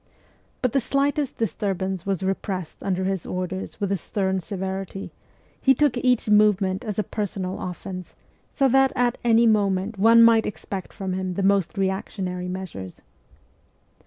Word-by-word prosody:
But 250 - +2
the 275 - +2
slightest 280 +3 0
disturbance 190 -3 -2
was 195 -1 -1
repressed 190 -2 -3
under 190 -1 -1
his 190 -2 -1
orders 185 +2 -4
with 200 -2 -1
a 200 - +2
stern 190 +2 -1
severity; 190 +1 -5 0.5
he 265 0 +5
took 290 -1 +2
each 250 -2 +2
movement 210 -1 +3
as 210 -4 -4
a 215 - +1
personal 195 -3 -4
offence, 185 0 -6 0.4
so 275 - +2
that 270 +1 +4
at 245 -2 +1
any 235 0 +5
moment 200 -1 +1
one 230 +3 +7
might 230 -1 +5
expect 195 -2 -6
from 190 -2 -4
him 185 -1 -3
the 195 - -1
most 195 0 +2
reactionary 190 -1 -2
measures. 180 - -7
195 Hz, 150 wpm, -24 LUFS, 185-225 Hz, 0.5 s, one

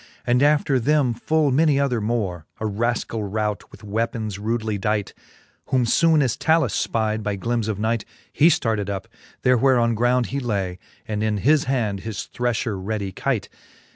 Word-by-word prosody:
And 125 +1 +2
after 145 -2 +3
them 140 -1 +2
full 150 +5 +1
many 145 +1 +3
other 125 -5 +1
more, 100 -7 -2
A 110 - -3
raskall 115 +1 -1
rout, 105 +1 -2
with - - -15
weapons 110 -1 -2
rudely 110 -1 -2
dight. 105 +1 -1 0.5
Whom 130 -2 +2
foone 160 +5 +4
as 125 -5 0
Talus 160 -7 +1
fpide 110 -1 -1
by 105 -1 -2
glims 115 +1 -1
of 110 -3 -2
night, 110 +1 0 0.3
He 155 - +5
ftarted 110 - +1
up, 100 -1 -4 0.4
there 125 0 +4
where 130 +2 +4
on 115 -1 +2
ground 120 +2 +2
he 140 - 0
lay, 100 -7 -2 0.3
And 105 -1 -2
in 110 -1 0
his 145 +8 +3
hand 115 -7 -1
his 110 0 -5
threiher 120 -4 -1
ready 100 -1 -3
keight. 120 -2 -2
115 Hz, 170 wpm, -23 LUFS, 105-130 Hz, 0.5 s, He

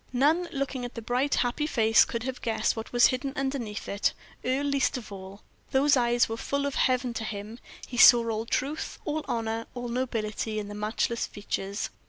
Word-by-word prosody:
None, 315 +7 +2
looking 275 -2 -3
at 245 - -6
the 230 - -5
bright, 250 +5 +1
happy 255 +5 0
face, 225 -5 +5
could 235 -1 -4
have 260 0 -4
guessed 220 -1 0
what 225 0 -6
was 240 0 +6
hidden 270 +1 -3
underneath 265 -6 -3
it 200 +1 0 0.3
Earle 260 +3 0
least 280 -2 +1
of 225 -4 -9
all. 195 +1 -9 0.3
Those 280 +2 +4
eyes 240 -1 +3
were 225 - -4
full 280 +4 -1
of 280 - -1
heaven 255 -2 +1
to 225 - -4
him; 215 +2 -6 0.3
he 245 - -7
saw 240 -1 +8
all 225 0 -2
truth, 285 +6 -2
all 310 0 -2
honor, 225 -1 -2
all 245 -1 -4
nobility 225 -3 -2
in 205 -1 -4
the - - -6
matchless 215 +3 -1
features. 200 0 -4
240 Hz, 195 wpm, -28 LUFS, 220-265 Hz, 0.3 s, saw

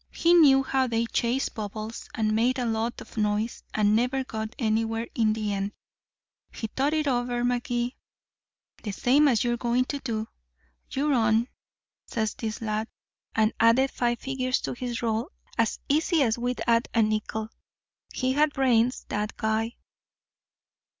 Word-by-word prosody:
He 340 +1 +3
knew 280 -6 +7
how 265 -1 +1
they 230 -1 0
chased 240 +3 0
bubbles, 215 +1 -6
and 215 -1 +1
made 245 +4 +2
a 250 - -1
lot 225 +1 -1
of - - -13
noise, 210 +2 0
and 210 0 +3
never 250 +3 +1
got 220 -3 -5
anywhere 225 0 0
in 220 -2 +2
the 215 -2 -2
end. 200 +1 -2 0.8
He - - -5
thought 275 +7 0
it 305 -1 0
over, 245 -2 0
Magee, 245 0 -1 0.9
the 205 -3 -4
same 275 +8 +4
as 240 -5 +3
you're 240 0 0
going 240 +1 +1
to 285 +2 -4
do. 225 -4 -3 0.6
'You're 290 +2 0
on,' 225 0 +2 0.6
says 220 -3 -1
this 225 +1 -5
lad, 215 0 -1 0.5
and 220 0 +3
added 235 +4 +4
five 240 -1 0
figures 255 -1 -1
to - - -3
his 245 -1 -4
roll 230 +5 0 0.3
as 230 -2 +1
easy 315 +1 +3
as 225 -3 +2
we'd 245 +1 -2
add 230 0 +2
a 225 - +5
nickel. 215 0 -2 0.6
He 255 0 0
had 295 +1 +3
brains, 250 -2 +2
that 210 +1 -3
guy." 220 +1 -1
235 Hz, 155 wpm, -27 LUFS, 220-255 Hz, 0.9 s, knew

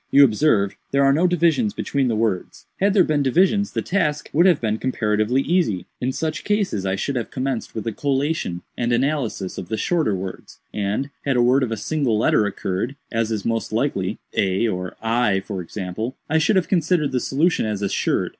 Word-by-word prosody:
"You 140 - +7
observe 105 -5 +2
there 140 0 +2
are 135 - +5
no 170 +5 +3
divisions 175 +5 +2
between 140 -2 0
the 115 - 0
words. 105 -4 -2
Had 200 +1 +2
there 190 - +6
been 150 -3 +1
divisions, 190 - +2
the - - -1
task 155 -6 -1
would 170 +5 +5
have 175 -5 +4
been 110 -1 -1
comparatively 110 +1 +1
easy. 160 - +1
In 125 +1 -1
such 155 +3 -3
case 205 -1 0
I 95 - 0
should 140 +7 -2
have 120 -3 -2
commenced 130 -2 -3
with 110 - -4
a 115 - -1
collation 135 - -1
and 120 0 -1
analysis 125 -6 -1
of 90 - -8
the 110 - -1
shorter 165 - +1
words, 95 0 -7 0.2
and, 105 +7 -2
had 135 -3 +1
a - - +4
word 130 +3 +4
of 125 -3 -1
a 115 - -2
single 130 0 0
letter 105 -1 +3
occurred, 100 +6 -3 0.2
as 115 -1 0
is 105 -3 -2
most 115 -3 -1
likely, - - -1 0.2
(a 95 +4 +1
or 90 -3 -3
I, 115 -4 +2
for 95 -1 -5
example,) 100 +7 -5
I 160 +1 +2
should 180 +7 +2
have 185 -2 +2
considered 165 -4 +1
the 130 - +1
solution 150 0 +1
as 105 -2 -3
assured. 100 - 0
125 Hz, 200 wpm, -22 LUFS, 105-155 Hz, 0.2 s, You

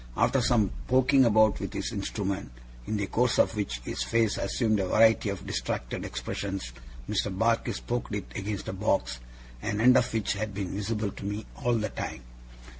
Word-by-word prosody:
After - - +3
some 110 -5 +3 0.2
poking 130 +1 +5
about 110 -2 +4
with 100 - -3
this 95 +1 -3
instrument, 100 - -3 0.4
in 110 - -1
the 100 - -1
course 120 +4 +1
of - - +3
which 65 - -3
his - - -3
face 115 -2 +2
assumed 110 +1 +1
a 95 - 0
variety 110 +1 +4
of 100 -3 -5
distracted - - -3
expressions, 90 +5 -4 0.4
Mr. - - 0
Barkis 115 +4 +1
poked 120 -3 -3
it 105 - -3
against 100 0 -4
a - - -3
box, 95 -10 0 0.4
an 105 -1 -2
end 125 +3 +6
of 125 -1 +3
which 110 -2 0
had 105 0 -4
been 95 -3 -3
visible 105 +1 -2
to - - -10
me 105 +2 -3 0.2
all 120 -1 +3
the 110 -2 -1
time. 65 - -5
105 Hz, 185 wpm, -28 LUFS, 100-115 Hz, 0.4 s, end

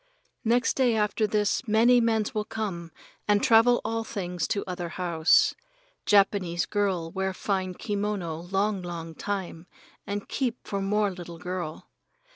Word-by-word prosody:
Next 240 +2 +2
day 250 -4 +3
after 210 0 +1
this 210 +4 0
many 235 +3 +5
mens 220 -2 +1
will 215 - -1
come 190 -7 -5 0.4
and 205 0 +3
travel 235 +2 +5
all 225 0 -1
things 180 -6 -3
to 200 - -1
other 180 -2 -4
house. 170 -2 +3 0.5
Japanese 195 -4 +3
girl 190 -6 -1
wear 190 0 -2
fine 185 -2 -2
kimono 200 -6 -2
long, 195 0 0
long 170 -2 -6
time, 185 -2 -5 0.4
and 205 0 -4
keep 250 -3 -1
for 200 -2 -2
more 205 +1 +1
little 175 -2 -9
girl. 180 -2 -5
200 Hz, 140 wpm, -27 LUFS, 180-215 Hz, 0.5 s, many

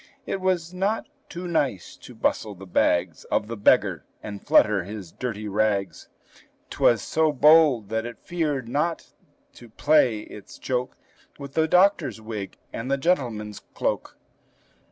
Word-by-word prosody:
It 195 - -3
was 180 -2 0
not 195 +4 -1 0.2
too 180 +1 -6
nice 140 - -1
to - - -13
bustle 105 -2 -1
the 95 +2 -11
bags 85 -1 +1
Of 105 - -1
the 115 - -5
beggar, 100 - +3 0.2
and 100 -1 -7
flutter 105 -4 +4
his 100 -2 -8
dirty 110 -4 -5
rags, 100 -1 -1 0.6
'T - - -9
was 115 -4 +4
so 160 -1 +1
bold 145 -6 +5
that 110 +1 -2
it 120 - -9
feared 150 -8 -2
not 150 +7 -2 0.4
to 120 - -14
play 130 -3 +3
its 105 -1 -12
joke 125 -1 -3 0.4
With 140 -1 -9
the 160 0 +2
doctor's 185 - +3
wig, 110 -3 -6 0.2
and 115 +3 -5
the 140 - +2
gentleman's 120 - -1 0.2
cloak. - - -2
120 Hz, 150 wpm, -25 LUFS, 105-160 Hz, 0.6 s, bold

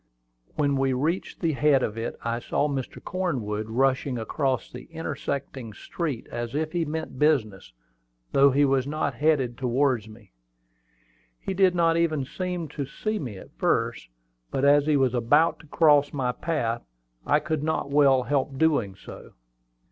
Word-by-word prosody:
When 140 -2 +1
we 135 -1 +1
reached 155 +8 -2
the 165 -3 +2
head 145 -2 +3
of 105 - -2
it, 115 +1 -4
I 115 0 -1
saw 145 +4 0
Mr. 135 -3 -4
Cornwood 115 - -2
rushing 130 +2 +1
across 130 +3 -1
the 125 0 -9
intersecting 140 -6 -5
street 145 - -4
as 120 +1 -4
if 155 +1 -1
he 170 -1 0
meant 155 -3 -5
business, 110 - +1 0.6
though 140 +1 +6
he 140 +2 +3
was 135 -1 +1
not 145 -1 -1
headed 130 -3 +1
towards 125 -3 +1
me. 110 -2 -16 1.1
He 195 - -4
did 185 -1 +3
not 165 -1 +3
even 155 -5 +1
seem 180 +2 -4
to 145 0 -4
see 215 +9 -3
me 120 -9 -6
at - - -14
first; - - 0 0.4
but 135 - 0
as 145 +1 +5
he 150 -2 +4
was 130 -3 +2
about 145 +7 +3
to 155 - -16
cross 145 -2 +4
my 130 -3 -1
path, 125 -6 -2 0.5
he 150 - +6
could 155 -1 -2
not 155 -2 -2
well 140 -3 +5
help 135 +1 -1
doing 135 -11 +1
so. - - -12
140 Hz, 165 wpm, -26 LUFS, 125-155 Hz, 1.1 s, though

